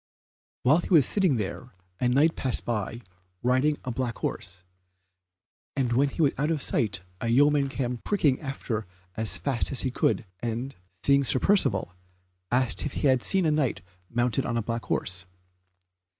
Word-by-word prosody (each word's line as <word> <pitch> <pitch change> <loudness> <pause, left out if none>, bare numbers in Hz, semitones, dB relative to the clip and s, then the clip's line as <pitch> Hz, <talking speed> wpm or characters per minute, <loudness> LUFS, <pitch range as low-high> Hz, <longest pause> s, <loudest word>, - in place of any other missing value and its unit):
While 145 +7 +5
he - - -6
was 160 -8 +6
sitting 190 -9 +2
there 105 +1 -5 0.2
a 125 - +2
Knight 145 +6 +3
passed 130 -2 -1
by 115 0 -3 0.4
riding 130 +4 +2
a 125 - -2
black 120 -1 -2
horse, 90 0 -5 1.1
and 125 -3 0
when 140 +4 +3
he 160 - -1
was 140 - +3
out 150 +2 +1
of 155 -4 -1
sight 100 -5 0 0.2
a - - -3
yeoman 140 +3 +3
came 125 -2 -3
pricking 150 - +1
after 125 - -4 0.3
as 110 0 +1
fast 135 -4 0
as 135 - +2
he 130 - -1
could, 120 - 0
and, 120 +4 -4 0.3
seeing 140 0 +4
Sir 130 - +3
Percivale, 130 - +2 0.6
asked 125 0 +2
if 145 - -3
he - - -2
had 130 -2 +3
seen 190 +4 +1
a 155 - +3
Knight 150 -5 0 0.3
mounted 120 +2 0
on 120 -1 -2
a 115 - -1
black 115 +1 -4
horse. 90 -1 -2
130 Hz, 170 wpm, -27 LUFS, 115-145 Hz, 1.1 s, was